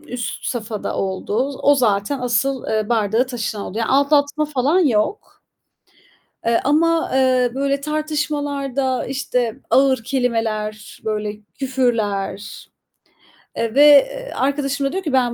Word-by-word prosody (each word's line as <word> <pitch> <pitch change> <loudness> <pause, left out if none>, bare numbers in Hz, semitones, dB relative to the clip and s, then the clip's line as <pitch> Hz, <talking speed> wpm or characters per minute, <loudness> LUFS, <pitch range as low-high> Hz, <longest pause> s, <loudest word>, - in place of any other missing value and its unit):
üst 250 -6 -6
safhada 220 -3 -4
oldu. 205 +7 -1
Z - - -7
o 285 - +5
zaten 220 +1 +1
asıl, 250 +2 0
ııı, 215 0 -1
bardağı 225 +1 +1
taşıran 225 -5 -4
oldu. 215 - -6
Yani 230 - -1
aldatma 285 +2 +2
falan 295 +3 +1
yok. 255 - 0 1.1
Eee, 230 0 +3
ama, 325 +3 +2
eee, 255 -2 +3
böyle, 275 +1 0
tartışmalarda, 290 -3 -2
işte, 250 -3 -2
ağır 265 -3 +3
kelimeler, 225 -4 -2
böyle, 210 -1 -2 0.2
küfürler, 220 -7 -2 0.9
eee, 230 0 -2
ve, 285 - +6
eee, - - +4
arkadaşım 275 0 0
da - - -3
diyor 380 +2 -3
ki, 305 -6 -3
"Ben 250 -2 +2
260 Hz, 130 wpm, -20 LUFS, 225-285 Hz, 1.1 s, ve